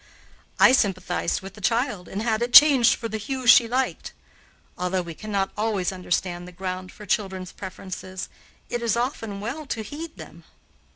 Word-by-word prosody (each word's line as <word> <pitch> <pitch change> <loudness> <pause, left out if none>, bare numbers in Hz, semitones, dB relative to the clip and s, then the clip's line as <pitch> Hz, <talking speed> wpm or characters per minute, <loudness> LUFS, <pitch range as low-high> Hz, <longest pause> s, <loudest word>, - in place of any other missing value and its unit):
I - - +8
sympathized 190 -8 0
with 195 0 -9
the 210 - -13
child 230 -2 0
and 205 +3 -4
had 225 -1 0
it 240 +1 -2
changed 280 -6 +8
for 230 - -5
the 220 0 -4
hue 260 +3 -4
she 235 0 +7
liked. 255 +3 -2 0.6
Although 180 +1 -1
we 170 -1 -7
cannot 200 +1 -2
always 210 -4 -1
understand 180 -1 -2
the - - -10
ground 185 0 -5
for 210 - -12
children's 190 -2 -2
preferences, 185 -1 -7 0.4
it 240 - -3
is 235 -1 0
often 225 -4 -3
well 275 +8 -5
to 225 -4 -3
heed 305 +8 -8
them. - - -12
210 Hz, 170 wpm, -24 LUFS, 185-240 Hz, 0.6 s, I